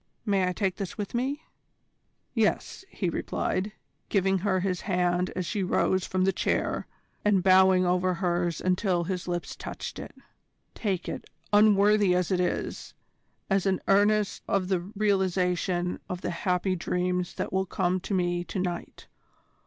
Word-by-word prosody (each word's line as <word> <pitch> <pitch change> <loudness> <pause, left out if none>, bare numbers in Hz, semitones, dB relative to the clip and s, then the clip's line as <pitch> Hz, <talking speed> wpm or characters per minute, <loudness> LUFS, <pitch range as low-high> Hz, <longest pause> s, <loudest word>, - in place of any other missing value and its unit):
May 195 -3 +2
I - - +1
take 190 0 -1
this 195 -4 -5
with 205 -2 -4
me?" 270 +5 -1 0.9
"Yes," - - 0
he 195 - -3
replied, 185 +3 -2 0.4
giving 195 -1 +2
her 190 -1 +1
his 185 -2 -1
hand 180 -1 +1
as 185 -1 -2
she 205 +3 -2
rose 185 0 +1
from 185 0 +1
her 195 - +4
chair, - - -1 0.4
and 200 -3 +3
bowing 185 -1 +6
over 180 0 +2
hers 175 -2 0
until 185 -1 +1
his 180 +1 -4
lips 175 -1 -3
touched - - -6
it. - - -9 0.6
"Take 190 -5 -2
it, - - -5 0.3
unworthy 205 -2 +5
as 180 0 0
it 185 - +2
is, 180 - -2 0.5
as 195 -1 +1
an 190 -1 +2
earnest 205 +1 +3
of 190 -2 0
the 190 -2 +2
realisation 185 -2 0
of 180 0 -4
the - - -2
happy 180 +2 0
dreams 180 0 -1
that - - -4
will 190 0 +1
come 185 0 0
to 195 +2 -3
me 175 -1 0
to - - -5
night. 180 -2 -4
185 Hz, 155 wpm, -27 LUFS, 180-195 Hz, 0.9 s, bowing